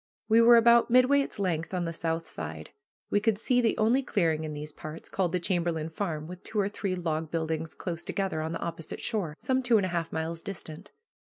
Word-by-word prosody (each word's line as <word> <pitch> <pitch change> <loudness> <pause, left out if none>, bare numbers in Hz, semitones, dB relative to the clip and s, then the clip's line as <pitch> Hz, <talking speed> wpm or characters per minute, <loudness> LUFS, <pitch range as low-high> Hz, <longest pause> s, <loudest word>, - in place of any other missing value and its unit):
We 225 +1 +6
were 235 +1 +8
about 235 +1 +6
midway 255 +3 +5
its 275 - -5
length 180 -3 -1
on 175 -1 -1
the 165 - -3
south 165 0 -2
side. - - -7 0.4
We 205 - +4
could 215 -1 +1
see 245 +3 +2
the 230 - +1
only 230 +5 +3
clearing 165 - 0
in 155 -1 -5
these 150 +1 -6
parts, 155 +2 -9
called 185 -3 0
the 180 - 0
"Chamberlain 170 -3 -1
Farm," 160 -3 -3
with 180 +2 -9
two 215 - -3
or 200 0 +2
three 200 -2 -2
log 160 -3 -2
buildings 160 -1 -2
close 170 -2 -5
together, 190 -5 -2
on 160 +1 -3
the - - -4
opposite 165 -1 -5
shore, 180 -9 -2
some 260 0 0
two 240 -3 +4
and 200 - +1
a - - -2
half 170 -2 -2
miles 160 +1 -3
distant. 180 0 -8
175 Hz, 225 wpm, -28 LUFS, 160-215 Hz, 0.4 s, were